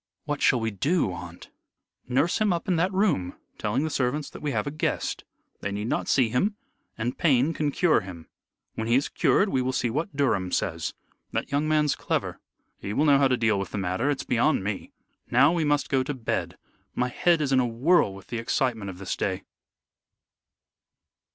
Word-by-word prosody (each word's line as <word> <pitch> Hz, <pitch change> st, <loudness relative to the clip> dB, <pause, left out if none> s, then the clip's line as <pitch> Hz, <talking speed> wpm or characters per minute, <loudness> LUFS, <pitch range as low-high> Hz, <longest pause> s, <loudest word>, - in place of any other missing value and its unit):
"What 145 Hz, -1 st, -3 dB
shall 125 Hz, -, +4 dB
we 115 Hz, 0 st, -1 dB
do, 140 Hz, -, +1 dB
aunt?" 85 Hz, 0 st, -10 dB, 0.6 s
"Nurse 135 Hz, +7 st, +1 dB
him 210 Hz, -2 st, +3 dB
up 170 Hz, -1 st, -2 dB
in 185 Hz, -, +2 dB
that 180 Hz, +3 st, +1 dB
room, 185 Hz, -, +1 dB, 0.2 s
telling 120 Hz, +7 st, 0 dB
the 160 Hz, -, -2 dB
servants 140 Hz, +2 st, -1 dB
that -, -, -10 dB
we 150 Hz, -, -2 dB
have -, -, -1 dB
a 145 Hz, -, -3 dB
guest. 155 Hz, -, -2 dB, 0.4 s
They 100 Hz, -, -3 dB
need 105 Hz, +3 st, -3 dB
not -, -, -1 dB
see 125 Hz, -4 st, +3 dB
him. 190 Hz, -, +1 dB, 0.4 s
And 120 Hz, +2 st, -3 dB
Payne 145 Hz, -1 st, +3 dB
can 150 Hz, -2 st, 0 dB
cure 160 Hz, -2 st, +3 dB
him. 90 Hz, -4 st, -10 dB, 0.5 s
When 110 Hz, -, -4 dB
he 120 Hz, -, +3 dB
is 135 Hz, -, +2 dB
cured 200 Hz, -, +2 dB
we 130 Hz, -, +1 dB
will 130 Hz, +1 st, 0 dB
see 120 Hz, -2 st, 0 dB
what 155 Hz, -, -3 dB
Durham 95 Hz, -10 st, +1 dB
says. 85 Hz, -2 st, -1 dB, 0.4 s
That -, -, -2 dB
young 145 Hz, +2 st, +1 dB
man's 150 Hz, -1 st, +2 dB
clever. -, -, -2 dB, 0.4 s
He 100 Hz, -, -5 dB
will 150 Hz, -, +2 dB
know 140 Hz, -2 st, +5 dB
how 140 Hz, -, +5 dB
to 130 Hz, -1 st, +1 dB
deal 110 Hz, -4 st, +2 dB
with 95 Hz, -, -4 dB
the -, -, -2 dB
matter. 95 Hz, +8 st, 0 dB
It's 145 Hz, -, -1 dB
beyond 125 Hz, -1 st, +2 dB
me. 100 Hz, -1 st, -4 dB, 0.4 s
Now 140 Hz, +6 st, +5 dB
we 170 Hz, -2 st, +1 dB
must 145 Hz, -1 st, +1 dB
go 135 Hz, -1 st, +2 dB
to 135 Hz, +2 st, -3 dB
bed. 120 Hz, -4 st, -3 dB, 0.4 s
My 125 Hz, 0 st, 0 dB
head 170 Hz, +6 st, +2 dB
is 145 Hz, -3 st, -1 dB
in 130 Hz, -, +4 dB
a 125 Hz, -, +2 dB
whirl 125 Hz, -, +3 dB
with 100 Hz, -, -12 dB
the 120 Hz, -, -3 dB
excitement 115 Hz, -3 st, -1 dB
of 90 Hz, -, -8 dB
this 95 Hz, 0 st, -3 dB
day." 95 Hz, -1 st, -2 dB
130 Hz, 205 wpm, -26 LUFS, 110-150 Hz, 0.6 s, know